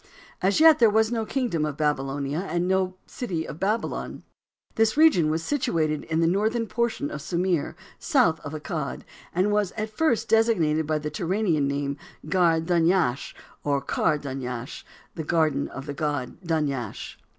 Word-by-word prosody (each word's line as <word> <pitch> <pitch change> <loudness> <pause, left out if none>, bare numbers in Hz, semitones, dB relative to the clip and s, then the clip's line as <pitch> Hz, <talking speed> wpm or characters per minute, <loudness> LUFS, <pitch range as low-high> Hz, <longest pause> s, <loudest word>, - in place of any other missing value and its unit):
As 195 +6 +2
yet 315 -1 +7
there 230 -3 +6
was 220 +1 +2
no 225 -2 -1
kingdom 240 - -1
of 150 -2 -3
Babylonia, 140 0 -1
and 175 -2 -1
no 185 0 +1
city 175 -10 -4
of 150 - -8
Babylon. 210 +5 -2 0.5
This 225 +3 +2
region 300 - +5
was 160 +1 -1
situated 160 - 0
in 160 +1 0
the - - +3
northern 215 +7 +1
portion 235 +6 -2
of - - -5
Sumir, 175 -3 -1 0.2
south 235 - +2
of 145 - -8
Accad, 155 -1 -4 0.3
and 185 +4 +1
was 205 -3 +1
at 215 -1 -4
first 235 -3 +1
designated 170 -10 +2
by 155 0 +1
the 150 0 -4
Turanian 170 -2 0
name, 140 0 -2 0.3
"Gar 165 -1 +3
Dunyash," 165 -4 +1 0.3
or 140 -1 +1
"Kar 150 +2 0
Dunyash," 130 -2 -6 0.3
the 160 - -5
"Garden 155 -3 +1
of 135 - -8
the 145 - -5
god, 145 -2 -3
Dunyash." 145 - -3
165 Hz, 160 wpm, -25 LUFS, 150-215 Hz, 0.5 s, yet